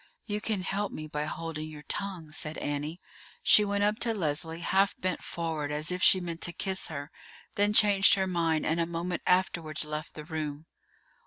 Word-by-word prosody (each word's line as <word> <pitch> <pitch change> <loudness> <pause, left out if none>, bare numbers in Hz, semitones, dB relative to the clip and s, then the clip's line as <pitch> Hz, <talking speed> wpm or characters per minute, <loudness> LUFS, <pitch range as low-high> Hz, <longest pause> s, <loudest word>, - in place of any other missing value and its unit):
"You 210 -1 -2
can 210 -4 -1
help 200 +2 -1
me 155 - -6
by 150 0 -3
holding 155 0 -4
your 150 -1 -10
tongue," 185 -6 -4
said 155 0 -4
Annie. 145 +4 -3 0.4
She 210 - +7
went 200 0 0
up 210 +1 +2
to 230 -1 +1
Leslie, 160 -1 -2
half 195 +3 +3
bent 185 -2 -1
forward 160 -3 -3
as 150 +3 -1
if 180 0 -2
she 190 - +7
meant 170 -2 -5
to 175 - +2
kiss 190 +2 -1
her, 145 0 -6 0.4
then 205 +1 +3
changed 205 -2 +6
her 190 -1 +1
mind, 165 -4 +1
and 160 +2 +1
a 165 - +1
moment 170 +1 -3
afterwards 170 -4 +1
left 150 0 -5
the 155 - -6
room. 155 -1 -4
170 Hz, 190 wpm, -29 LUFS, 155-195 Hz, 0.4 s, She